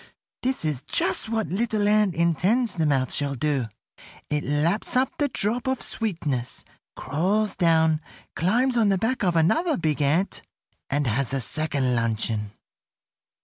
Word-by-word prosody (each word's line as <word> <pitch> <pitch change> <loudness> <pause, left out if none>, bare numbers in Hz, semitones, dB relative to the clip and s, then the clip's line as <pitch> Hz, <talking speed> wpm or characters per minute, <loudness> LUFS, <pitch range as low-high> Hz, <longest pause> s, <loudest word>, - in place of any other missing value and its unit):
This 260 -8 -1
is 150 -5 -1
just 190 +8 -1
what 220 -2 -1
Little 215 +1 0
Ant 210 -4 +3
intends 185 - +1
the 160 -3 0
mouth 135 -3 +1
shall 140 -1 -1
do. 135 -2 0 0.6
It 150 0 0
laps 160 - 0
up 255 +1 +2
the 290 - +2
drop 240 0 0
of 260 -1 0
sweetness, 150 - -3 0.3
crawls 195 +9 0
down, 160 -2 +3 0.3
climbs 245 +9 +1
on 220 -3 +4
the 195 - +2
back 225 +5 -1
of 175 -3 +1
another 305 - +2
big 155 -3 0
ant, 155 +8 +1 0.5
and 145 +1 0
has 130 +3 -1
a - - 0
second 140 -1 -1
luncheon. 110 -2 -1
170 Hz, 145 wpm, -25 LUFS, 145-215 Hz, 0.6 s, on